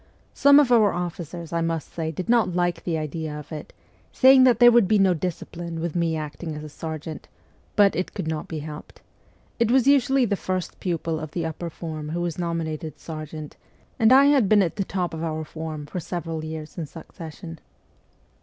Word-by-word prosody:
Some 280 +1 +7
of 275 -4 +3
our 220 -4 +5
officers, 170 -1 -5
I 170 - +1
must 165 -1 -3
say, 160 -2 -2
did 180 +5 -5
not 225 -7 +3
like 175 -1 0
the 165 -2 0
idea 155 0 -4
of 150 - -10
it, 155 -1 -7 0.4
saying 260 0 +7
that 245 -4 +5
there 240 0 +8
would 235 -4 +5
be 215 +1 +4
no 195 -2 +4
discipline 170 0 -5
with 170 0 -3
me 170 -2 +1
acting 155 +1 -5
as 150 - -7
a 155 - -8
sergeant, 155 0 -7 0.5
but 200 -3 +5
it 180 +3 -3
could 185 -6 -3
not 160 -1 -3
be 160 - -5
helped; 150 -1 -10 0.6
it 230 -1 +3
was 255 0 +4
usually 270 -1 +4
the 205 -2 0
first 185 -2 -4
pupil 165 -3 -2
of 155 -1 -6
the 170 -2 -2
upper 165 +1 -4
form 155 -2 -6
who 170 +2 -2
was 175 -1 -3
nominated 160 -3 -3
sergeant, 155 -1 -8 0.4
and 225 +1 +5
I 270 +2 +8
had 275 -8 +4
been 210 -2 +6
at 170 - -3
the 200 - +1
top 180 -3 -3
of 160 0 -4
our 155 -1 -3
form 155 -1 -6
for 180 - -5
several 165 -2 -4
years 155 +1 -7
in 160 - -4
succession. 165 +1 -10
170 Hz, 200 wpm, -24 LUFS, 155-195 Hz, 0.6 s, there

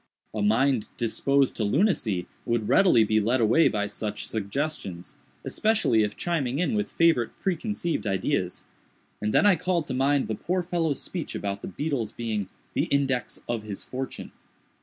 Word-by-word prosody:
A 110 - -2
mind 115 +3 +2
disposed 135 +4 +2
to 110 - 0
lunacy 110 - +1 0.2
would 115 -3 -1
readily 180 - +5
be 110 0 +2
led 120 +5 +1
away 115 +9 +5
by 105 -1 0
such 105 0 -4
suggestions—especially 115 - -1
if 105 -1 -1
chiming 140 -7 -1
in 180 +6 +1
with 210 -1 -1
favorite 165 -9 +2
preconceived 180 - -2
ideas—and 95 +2 -3
then - - +4
I 205 -2 +6
called 175 -1 0
to - - -4
mind 135 +2 +2
the 110 - -2
poor 180 - -1
fellow's 165 -4 -1
speech 175 -4 -5
about 100 0 -3
the - - -6
beetle's 120 - -2
being 110 -4 -3 0.2
"the - - +1
index 135 -3 0
of 120 -2 -1
his 105 -2 -6
fortune." 130 +1 -6
125 Hz, 155 wpm, -26 LUFS, 105-165 Hz, 0.2 s, I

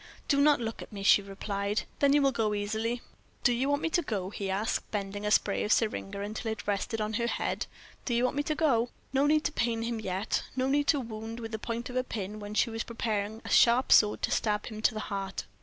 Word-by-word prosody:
"Do 280 -1 +3
not 295 -2 +5
look 225 -1 -4
at - - -10
me," 200 -2 -6
she 200 - +6
replied, 200 +1 -2 0.2
"then 280 -1 +4
you 290 -1 +4
will 275 - +4
go 220 -4 0
easily 220 +3 -1
enough." 240 - -7 0.4
"Do 245 - +4
you 260 +4 0
want 285 +1 +1
me 330 - +1
to 345 - +3
go?" 200 - -3
he 200 -2 -4
asked, 200 +4 -1
bending 205 0 -3
a - - +2
spray 210 -1 +2
of 210 - -1
syringa 200 -3 0
until 215 +2 -3
it 220 - -6
rested 205 +3 -1
on 215 0 -2
her 235 +2 0
head. - - -2 0.4
"Do 240 - 0
you 240 - +2
want 255 - +1
me 290 - +1
to 305 +1 -1
go?" 245 -7 +2 0.2
No 275 +2 +3
need 305 +1 +3
to - - 0
pain 230 -5 0
him 230 -1 -2
yet. 195 0 -1
No 260 0 +1
need 285 +1 +2
to 290 - +4
wound 225 -1 -6
with 225 -1 -6
the 220 - -3
point 235 +2 -4
of - - -8
a 255 - +2
pin 210 -3 -5
when 205 0 -7
she 230 - +2
was 225 0 -3
preparing 220 -2 -3
a - - -5
sharp 240 +2 +5
sword 210 -1 +5
to - - +1
stab 210 -1 0
him 215 -2 -7
to 220 - +2
the 215 - -2
heart. 195 -2 -4
225 Hz, 255 wpm, -29 LUFS, 205-245 Hz, 0.4 s, she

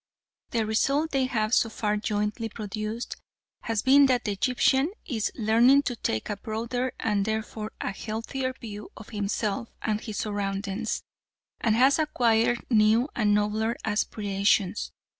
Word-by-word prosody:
The 225 -2 0
result 275 +9 +1
they 270 -2 +2
have 215 -2 -1
so 230 - +4
far 210 -1 -1
jointly 210 +2 -2
produced 215 +2 -5 0.5
has 225 -2 0
been 275 +1 +7
that 250 -2 +2
the 210 - 0
Egyptian 265 - +2
is 225 -6 -1
learning 240 +5 +5
to 245 - -2
take 110 - -2
a 205 - -3
broader 235 +4 -3
and 205 -3 +1
therefore 220 0 -3
a - - -2
healthier 230 +6 -4
view 210 -3 -8
of 210 - -11
himself 210 +1 -2
and 215 -1 -1
his 215 -3 -6
surroundings, 205 +1 -2 0.6
and 220 -2 +2
has 265 +6 +5
acquired 240 -5 +2
new 220 +4 +4
and 210 -3 +3
nobler 215 +2 0
aspirations. 205 -1 0
220 Hz, 140 wpm, -27 LUFS, 210-240 Hz, 0.6 s, been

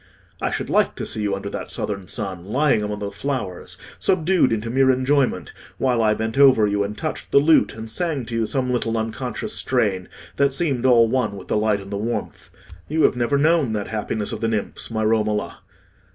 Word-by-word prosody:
I - - 0
should - - -4
like - - +2
to - - -5
see 110 - -5
you 100 -1 0
under 100 +1 -6
that - - -5
southern 100 -3 -4
sun, 95 -4 -4
lying 130 +2 +2
among 105 0 -3
the 100 -1 -4
flowers, 100 -5 -4 0.2
subdued 180 -5 +2
into 115 +1 -2
mere 135 +1 +3
enjoyment, 130 +1 +1 0.2
while 125 -3 +1
I 110 -1 +3
bent 110 +4 -3
over 130 -6 +6
you 100 0 0
and 105 +1 -5
touched 155 - -4
the - - +3
lute 155 +3 +4
and 110 0 -7
sang 145 +2 -2
to 115 - -8
you 115 -1 +1
some 130 -1 -1
little 115 -2 -1
unconscious 120 - -4
strain 105 -8 0 0.3
that 140 -1 +3
seemed 135 -5 0
all 115 -2 +6
one 125 -3 0
with 95 - -11
the - - +1
light 105 -1 +1
and 100 +1 -11
the 100 - -2
warmth. 115 +3 -4 0.4
You 155 +1 +1
have - - +4
never 125 +3 +1
known 150 -5 +2
that 105 -2 -3
happiness 110 -1 -2
of 110 - -5
the 115 - +1
nymphs, 110 -2 -3
my 110 -1 -2
Romola." 110 -1 0
115 Hz, 210 wpm, -22 LUFS, 105-135 Hz, 0.4 s, over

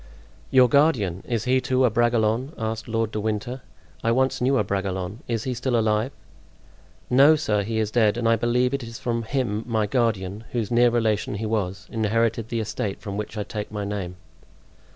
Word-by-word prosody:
"Your 130 -1 +6
guardian! 115 - +2
is 115 -3 -1
he, 130 +2 +2
too, 130 +1 +2
a 120 - +2
Bragelonne?" 120 +3 +1
asked 110 0 -3
Lord 115 -1 -1
de 110 - -3
Winter. 110 +4 -3 0.4
"I 115 - +2
once 130 +2 +1
knew 135 +2 +3
a 105 - +2
Bragelonne—is 100 +3 -3
he 130 - -2
still 125 0 0
alive?" 110 +3 +1 1.0
"No, 140 +5 +6
sir, 105 -9 0
he 110 +2 -3
is 110 -1 0
dead; 110 -2 +3
and 120 -1 0
I 115 - +5
believe 125 +3 +1
it 140 - -1
is 115 -1 -8
from 120 -3 -2
him 115 -3 -2
my 110 -3 +1
guardian, 105 -3 -1
whose 115 -3 -2
near 120 +1 +5
relation 110 -3 0
he 110 +2 -3
was, 95 -4 -2
inherited 115 +1 0
the 115 -1 -1
estate 105 -2 -3
from 100 -1 -6
which 105 +1 -5
I 105 - -1
take 105 0 -6
my 105 -1 -3
name." 100 -3 -4
115 Hz, 190 wpm, -24 LUFS, 105-120 Hz, 1.0 s, Your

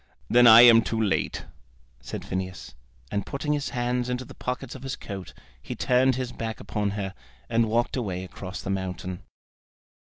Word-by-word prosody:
"Then 120 0 +7
I 115 +1 +11
am 115 -1 +9
too 115 0 -2
late," 105 -3 0 0.5
said - - -7
Phineas, 95 0 -5 0.4
and 100 - -1
putting 150 +1 -2
his 145 -1 -2
hands 125 0 -1
into 125 +1 -2
the - - -12
pockets 125 0 -4
of 130 - -10
his 135 0 -4
coat, 95 -3 -8 0.3
he - - -6
turned 130 +1 +3
his 130 -1 -3
back 115 -2 -5
upon 105 0 -2
her, 95 -2 -3 0.4
and 115 -1 +2
walked 120 +2 +1
away 95 -8 -3
across 95 0 -8
the 95 - -3
mountain. 90 -1 -4
115 Hz, 170 wpm, -26 LUFS, 95-125 Hz, 0.5 s, I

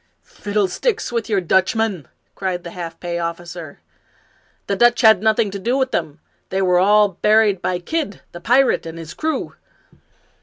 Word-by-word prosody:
" - - -47 0.2
Fiddlestick 210 - -1
with 230 -1 -2
your 205 -3 +2
Dutchmen! 190 - 0
" - - -47
cried 185 -2 -3
the 170 - -8
half 170 -2 -7
pay 175 -1 -4
officer. 170 -2 -6 0.4
" - - -38
The 200 - -1
Dutch 240 +3 +4
had 220 -5 +6
nothing 220 -1 +2
to 200 - -5
do 240 +7 0
with 265 -1 0
them. 160 -2 -3 0.3
They 190 +1 0
were 180 -1 +3
all 205 +2 +4
buried 210 +1 +2
by 180 - -1
Kidd 205 - -4
the 175 - -10
pirate, 250 -3 +2
and 165 0 -8
his 165 -1 -8
crew." 315 0 -3
195 Hz, 180 wpm, -20 LUFS, 175-220 Hz, 0.4 s, had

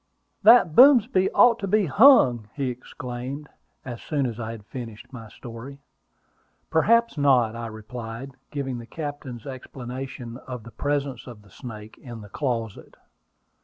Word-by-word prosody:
"That 215 -6 +7
Boomsby 240 - +6
ought 240 -1 +5
to 195 - -3
be 210 +1 +2
hung!" 130 - +5
he 135 -3 -1
exclaimed, 125 +3 -7 0.4
as 120 -3 -7
soon 145 -3 -1
as 120 -2 -4
I 115 -1 -4
had 115 -3 -9
finished 120 0 -9
my 115 -3 -9
story. 120 +4 -10 0.9
"Perhaps 230 +3 +3
not," 125 -6 +3
I 115 0 -5
replied, 115 +3 -8 0.2
giving 135 -4 -4
the 115 - -10
captain's 145 -7 -7
explanation 130 -1 -7
of 125 -3 -6
the 115 - -12
presence 140 +3 -3
of 115 -4 -11
the 105 - -21
snake 110 -4 -10
in 120 -3 -9
the 105 - -12
closet. 115 -5 -4
125 Hz, 145 wpm, -24 LUFS, 115-145 Hz, 0.9 s, That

